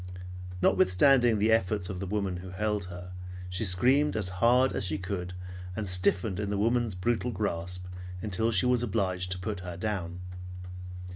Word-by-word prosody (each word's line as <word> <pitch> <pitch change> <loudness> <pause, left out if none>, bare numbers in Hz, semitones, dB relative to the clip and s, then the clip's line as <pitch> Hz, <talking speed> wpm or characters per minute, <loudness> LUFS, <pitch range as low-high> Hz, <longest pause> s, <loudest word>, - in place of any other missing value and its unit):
Notwithstanding 120 +4 +5
the 110 +2 +3
efforts 105 -3 +2
of 95 -1 -5
the 95 - -3
woman 100 -2 -1
who 90 +1 -8
held 105 +1 -1
her, 90 0 -8 0.4
she 90 +3 -1
screamed 125 +10 +3
as 100 -4 -1
hard 125 +3 +5
as - - -1
she 85 -4 +1
could 90 -1 -4 0.4
and 110 -2 -3
stiffened 90 +2 +2
in 105 -1 -1
the 100 - 0
woman's 115 0 +1
brutal 120 +6 0
grasp 90 -3 -3 0.3
until 110 +3 0
she 95 -1 +4
was 125 -1 +3
obliged 95 -5 0
to 90 - -2
put 100 +2 -3
her 90 -2 -6
down. 90 -3 -3
100 Hz, 165 wpm, -29 LUFS, 90-110 Hz, 0.4 s, Notwithstanding